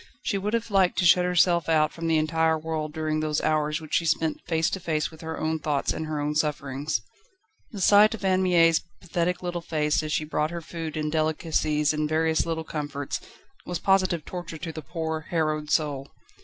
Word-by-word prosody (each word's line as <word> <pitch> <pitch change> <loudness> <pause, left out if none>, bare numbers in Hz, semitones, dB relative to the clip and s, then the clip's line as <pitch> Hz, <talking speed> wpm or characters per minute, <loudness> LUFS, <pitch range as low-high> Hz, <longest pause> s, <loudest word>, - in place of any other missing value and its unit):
She 200 - 0
would 210 +4 -1
have 230 -1 -3
liked 190 -2 +3
to 180 - +2
shut 180 +1 +6
herself 175 -1 +3
out 155 -1 +3
from 165 0 -4
the 165 -1 +3
entire 160 +1 +2
world 155 -1 -3
during 155 0 -1
those 155 -1 0
hours 150 0 +1
which 155 -2 -11
she 170 - +2
spent 160 0 0
face 160 -1 +1
to 190 - -2
face 155 -3 -1
with 160 - -14
her 160 0 -5
own 160 0 -1
thoughts 145 -2 0
and 160 - -4
her 155 -1 -2
own 145 +1 -1
sufferings. 145 -4 -1 0.7
The 205 -5 -6
sight 210 +4 +6
of 205 - -7
Anne 185 0 +3
Mie's 165 -3 +4 0.2
pathetic 180 +1 -2
little 175 -1 -3
face 150 -2 0
as 155 -1 -4
she 155 - 0
brought 150 0 -1
her 170 0 -5
food 160 -1 -6
and 150 0 -1
delicacies 155 -1 +1
and 150 0 -1
various 160 +1 +1
little 160 -1 -2
comforts, 145 -3 -4 0.4
was 180 - -3
positive 185 -3 +2
torture 175 -2 -6
to 165 +1 -5
the 155 - -7
poor, 160 0 -4
harrowed 155 -2 -1
soul. 145 -3 0
160 Hz, 205 wpm, -26 LUFS, 155-170 Hz, 0.7 s, shut